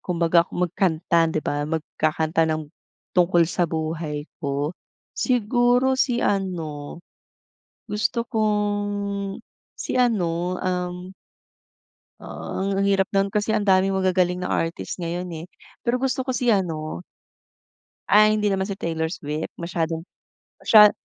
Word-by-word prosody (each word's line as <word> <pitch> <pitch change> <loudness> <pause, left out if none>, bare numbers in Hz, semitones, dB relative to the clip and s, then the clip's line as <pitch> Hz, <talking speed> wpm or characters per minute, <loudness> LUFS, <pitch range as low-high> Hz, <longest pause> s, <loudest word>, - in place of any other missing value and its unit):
kumbaga 170 -1 +2
magkanta, 170 -1 +1
'di 155 - -1
ba, 145 +1 -1
magkakanta, 160 0 0
ng 155 -1 -1 0.5
tungkol 175 -1 +4
sa 170 +1 0
buhay 155 -2 -3 0.2
ko. 145 +1 -1 0.4
Siguro 245 +1 +2
si 245 -2 +1
ano, 170 -7 -2 0.9
gusto 225 +3 -1
kong, 205 -2 -1 0.4
si - - -4
ano, 180 -6 0
um 180 0 -3 1.1
ah, 195 +1 -4
ang 195 - +1
hirap 195 -1 +3
no'n 195 0 +2
kasi 210 +2 0
ang - - +1
daming 190 0 +4
magagaling 185 -1 +1
na - - -2
artist 165 +3 -2
ngayon, 175 +1 -3 0.2
eh. - - -12 0.4
Pero, 245 +1 +1
gusto 265 0 0
kasi 250 -2 +1
ano 160 - -1 1.1
ay 215 +1 +6
hindi 210 0 +1
naman 195 -1 0
si 200 - -3
Taylor 160 -1 -2
Swift, 150 -2 -4
masyadong 165 0 -2 0.5
masya 210 -2 +8
180 Hz, 120 wpm, -23 LUFS, 165-205 Hz, 1.1 s, masya